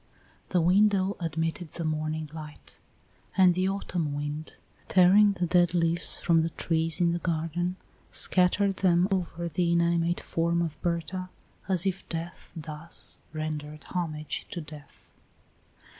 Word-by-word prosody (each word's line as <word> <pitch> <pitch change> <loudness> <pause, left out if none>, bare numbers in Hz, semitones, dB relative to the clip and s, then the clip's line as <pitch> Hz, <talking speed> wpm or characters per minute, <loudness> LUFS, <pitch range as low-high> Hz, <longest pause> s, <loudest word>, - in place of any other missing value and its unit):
The 180 - +2
window 195 +2 +4
admitted 165 0 -2
the 170 - -4
morning 155 0 -2
light; 155 -2 -10 0.6
and 185 -2 +7
the 185 +2 +1
autumn 175 -6 -2
wind, 145 +2 -4 0.3
tearing 195 +3 +6
the 180 -2 -1
dead 175 0 +3
leaves 170 0 0
from 165 -2 +3
the 165 - 0
trees 165 -1 -1
in 170 -1 +3
the 170 - -1
garden, 170 +2 -1 0.3
scattered 190 +2 +2
them 180 -1 +4
over 170 -2 -1
the 170 +1 0
inanimate 170 0 +2
form 170 +1 0
of 155 -3 -5
Berta, 180 +2 -2 0.4
as 185 -2 +2
if 190 0 -2
death 170 +1 -6
thus 160 0 -6
rendered 155 -1 -5
homage 155 -4 -3
to 175 - -5
death. 150 -2 -12
170 Hz, 135 wpm, -28 LUFS, 160-180 Hz, 0.6 s, and